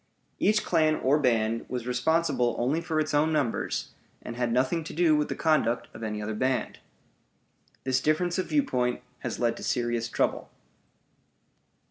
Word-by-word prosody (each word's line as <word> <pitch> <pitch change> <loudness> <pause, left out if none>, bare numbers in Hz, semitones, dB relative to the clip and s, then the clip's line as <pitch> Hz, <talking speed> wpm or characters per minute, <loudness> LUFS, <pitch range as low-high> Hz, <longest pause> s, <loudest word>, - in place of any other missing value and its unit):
Each 215 +1 +3
clan 155 -2 +3
or 140 +2 +2
band 115 -4 +1
was 125 -2 -4
responsible 125 -1 +1
only 135 +7 0
for 165 -2 -1
its 155 0 -1
own 150 +2 +3
members, 145 -7 -1 0.3
and 120 - -6
had 120 -1 -1
nothing 130 +7 +1
to - - -7
do 165 -2 +4
with 150 0 +1
the - - -2
conduct 150 -7 +1
of 110 - -10
any 105 -1 -3
other 110 +1 -3
band. 130 +3 -1 1.0
This 130 0 +1
difference 175 +5 +1
of 185 - -1
viewpoint 125 - 0 0.2
has - - -4
led 115 -1 +1
to - - -8
serious 120 -1 -1
trouble. - - -1
130 Hz, 160 wpm, -27 LUFS, 120-155 Hz, 1.0 s, do